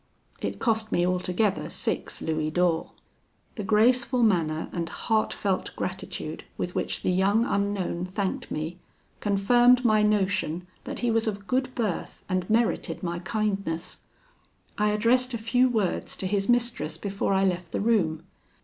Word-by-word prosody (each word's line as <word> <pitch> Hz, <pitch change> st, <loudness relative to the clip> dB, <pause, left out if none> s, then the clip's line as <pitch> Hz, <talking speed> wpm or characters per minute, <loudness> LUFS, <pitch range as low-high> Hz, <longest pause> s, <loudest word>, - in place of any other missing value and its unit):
It -, -, -3 dB
cost 220 Hz, -2 st, 0 dB
me 175 Hz, -, +2 dB
altogether 180 Hz, +3 st, 0 dB
six -, -, -3 dB
louis 155 Hz, -1 st, -1 dB
d'ors. 170 Hz, 0 st, +1 dB, 0.6 s
The 210 Hz, -, -5 dB
graceful 240 Hz, +4 st, +3 dB
manner 165 Hz, -7 st, +2 dB
and 170 Hz, -2 st, -3 dB
heartfelt 215 Hz, -3 st, -1 dB
gratitude -, -, -5 dB
with -, -, -3 dB
which -, -, -2 dB
the -, -, +2 dB
young 200 Hz, +5 st, +3 dB
unknown 200 Hz, -6 st, -1 dB
thanked 190 Hz, +1 st, -3 dB
me, 160 Hz, +4 st, -4 dB, 0.4 s
confirmed 240 Hz, +5 st, +4 dB
my 215 Hz, -2 st, +5 dB
notion 195 Hz, -5 st, +1 dB, 0.2 s
that -, -, -5 dB
he 235 Hz, -, +3 dB
was 225 Hz, 0 st, +1 dB
of 200 Hz, -2 st, -3 dB
good 255 Hz, +3 st, -1 dB
birth 215 Hz, -8 st, -3 dB
and 185 Hz, -1 st, -1 dB
merited 225 Hz, -2 st, +1 dB
my 170 Hz, -1 st, -2 dB
kindness. 195 Hz, -4 st, -2 dB, 0.8 s
I 210 Hz, 0 st, +2 dB
addressed 240 Hz, +4 st, +2 dB
a -, -, -1 dB
few 245 Hz, +3 st, +2 dB
words 215 Hz, -6 st, -1 dB
to -, -, -4 dB
his 195 Hz, +2 st, 0 dB
mistress 235 Hz, -11 st, +1 dB
before 200 Hz, 0 st, -1 dB
I 190 Hz, 0 st, +3 dB
left 180 Hz, -2 st, -1 dB
the -, -, -1 dB
room. 180 Hz, -8 st, +1 dB
200 Hz, 150 wpm, -26 LUFS, 180-225 Hz, 0.8 s, my